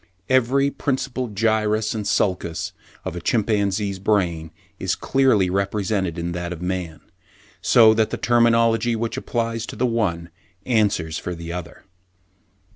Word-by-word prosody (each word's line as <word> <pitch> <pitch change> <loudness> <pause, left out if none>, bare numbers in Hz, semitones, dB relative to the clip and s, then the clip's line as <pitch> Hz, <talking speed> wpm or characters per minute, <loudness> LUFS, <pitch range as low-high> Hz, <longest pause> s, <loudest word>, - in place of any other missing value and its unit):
Every 130 +2 +3
principal 130 -2 -2
gyrus 110 0 +1
and 110 -2 -4
sulcus 90 -5 -1 0.3
of - - -4
a 90 - -5
chimpanzee's 100 -2 0
brain 90 -6 0 0.3
is 95 -1 0
clearly 130 -8 +2
represented 95 -1 -1
in 85 +1 -3
that 85 0 -4
of 90 - -5
a - - -8
man, 90 -4 -4 0.6
so 110 -2 +6
that 110 0 +1
the - - -3
terminology 115 0 +3
which 115 +1 -2
applies 115 -3 -2
to - - -7
the - - 0
one 90 -8 -1 0.3
answers 100 -9 +1
for 90 - -5
the 85 0 -7
other. 90 -2 -7
105 Hz, 140 wpm, -22 LUFS, 90-115 Hz, 0.6 s, so